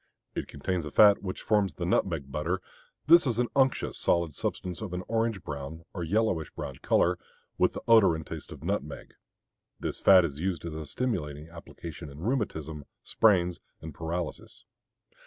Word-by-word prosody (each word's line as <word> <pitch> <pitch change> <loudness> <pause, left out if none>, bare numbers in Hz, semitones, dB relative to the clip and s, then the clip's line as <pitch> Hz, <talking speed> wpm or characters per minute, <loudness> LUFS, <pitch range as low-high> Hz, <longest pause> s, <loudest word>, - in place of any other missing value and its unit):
It - - -4
contains 85 +4 -3
a 75 - -5
fat 100 +6 +6
which 95 -2 -5
forms 105 -4 +2
the 85 - -3
nutmeg 80 -6 0
butter; 80 +6 -1 0.5
this 170 0 +7
is 115 -3 0
an 120 -1 +1
unctuous 135 -1 +2
solid 85 -3 +2
substance 90 +5 -4
of 100 -5 -5
an 90 +1 -3
orange 115 -4 0
brown 75 +3 -6
or 90 - -4
yellowish 95 -3 0
brown - - -6
color, - - +2 0.4
with - - +3
the - - -7
odor 110 -7 +6
and 80 0 -6
taste - - -8
of - - -10
nutmeg. 75 +2 -4 0.7
This - - -4
fat 95 -3 +7
is 70 -3 -5
used 90 -1 -2
as 85 - -5
a 80 -1 -6
stimulating 80 - -3
application 85 -2 -9
in 70 - -12
rheumatism, 80 - -2 0.2
sprains, 90 -5 +3 0.2
and 80 -1 -8
paralysis. 85 +1 -5
85 Hz, 170 wpm, -28 LUFS, 80-105 Hz, 0.7 s, this